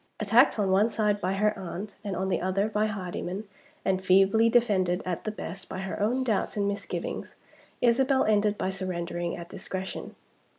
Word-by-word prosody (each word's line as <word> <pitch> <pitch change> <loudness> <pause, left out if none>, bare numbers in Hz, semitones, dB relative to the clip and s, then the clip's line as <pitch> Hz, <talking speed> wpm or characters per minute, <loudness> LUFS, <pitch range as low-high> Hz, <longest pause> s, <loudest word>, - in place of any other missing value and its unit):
Attacked 225 +6 +5
on 200 -3 +1
one 200 +4 +4
side 210 -2 0
by 185 +1 0
her 210 +2 +2
aunt, 195 +2 -6
and 200 -3 -3
on 190 +2 -1
the - - 0
other 190 +3 +1
by 215 0 +1
Hardyman, 195 0 -4 0.4
and 190 0 +1
feebly 195 +5 +5
defended, 195 -7 +2
at 180 -2 -3
the 215 - -1
best, 195 -3 -7
by - - -5
her 190 -1 -4
own 240 +6 +1
doubts 220 -3 -1
and 200 -1 +1
misgivings, 200 0 -4 0.5
Isabel 265 +3 +4
ended 210 -1 +2
by 190 - -1
surrendering 175 -2 -3
at 170 - -8
discretion. 190 +1 -6
200 Hz, 175 wpm, -28 LUFS, 185-215 Hz, 0.5 s, Attacked